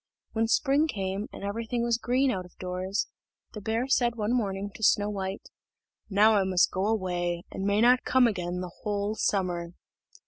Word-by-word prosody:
When 225 0 0
spring 280 +6 +3
came, 195 -4 -3
and - - -9
everything 230 +3 -2
was 235 -1 +1
green 255 +3 +2
out 185 -5 -3
of 180 - -17
doors, 185 +2 -2 0.5
the 210 - -7
bear 225 +5 -1
said 240 -3 +2
one 220 +1 -1
morning 200 -4 -1
to - - -12
Snow 210 -1 +3
white: 195 -1 -4 0.6
"Now 210 +2 +5
I 195 - +3
must 185 -1 +3
go 190 +2 -1
away, 175 -5 -1
and 190 - -4
may 205 +1 +2
not 250 +2 +5
come 260 -1 +4
again 180 -5 -1
the 180 -1 -6
whole 205 0 -1
summer." 180 -5 -1
205 Hz, 180 wpm, -28 LUFS, 190-230 Hz, 0.6 s, Now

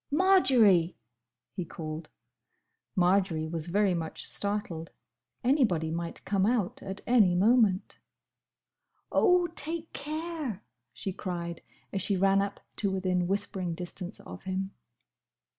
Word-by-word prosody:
"Marjory!" 255 - +4 0.6
he 180 - -3
called. 155 -1 -7 0.9
Marjory 180 -3 +2
was 160 0 -3
very 200 +1 +2
much 165 -2 -3
startled. 200 -5 -2 0.5
Anybody 225 - +2
might 170 +1 -5
come 195 -1 +1
out 220 -6 0
at 195 +1 -6
any 215 -8 +5
moment. 210 -1 +3 1.1
"Oh! 360 -3 +4
take 330 +1 -2
care!" 305 - -4 0.3
she 130 - -5
cried, 170 -3 -5 0.3
as 195 - 0
she 200 - +2
ran 195 +1 +4
up 200 0 -4 0.2
to 200 - +1
within 185 -2 0
whispering 190 -2 -1
distance 180 +2 -5
of - - -10
him. 190 +1 -2
195 Hz, 115 wpm, -29 LUFS, 175-230 Hz, 1.1 s, any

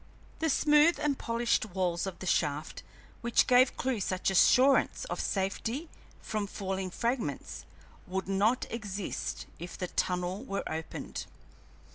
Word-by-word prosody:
The 320 - +1
smooth 300 +3 +5
and 290 -2 0
polished 235 +1 +1
walls 180 -3 -1
of 190 - -5
the - - -8
shaft, 150 -3 0 0.4
which 235 0 +3
gave 250 0 +5
Clewe 255 -3 -1
such 185 0 0
assurance 260 +8 +4
of - - -2
safety 225 - -2 0.3
from 215 -2 -3
falling 190 -1 -3
fragments, 230 - -3 0.4
would 190 +1 -3
not 205 +6 +2
exist 205 -4 -4
if 175 +2 -7
the 180 - -3
tunnel 180 +4 -1
were 200 -7 -3
opened. 160 +1 -5
200 Hz, 130 wpm, -30 LUFS, 185-250 Hz, 0.4 s, smooth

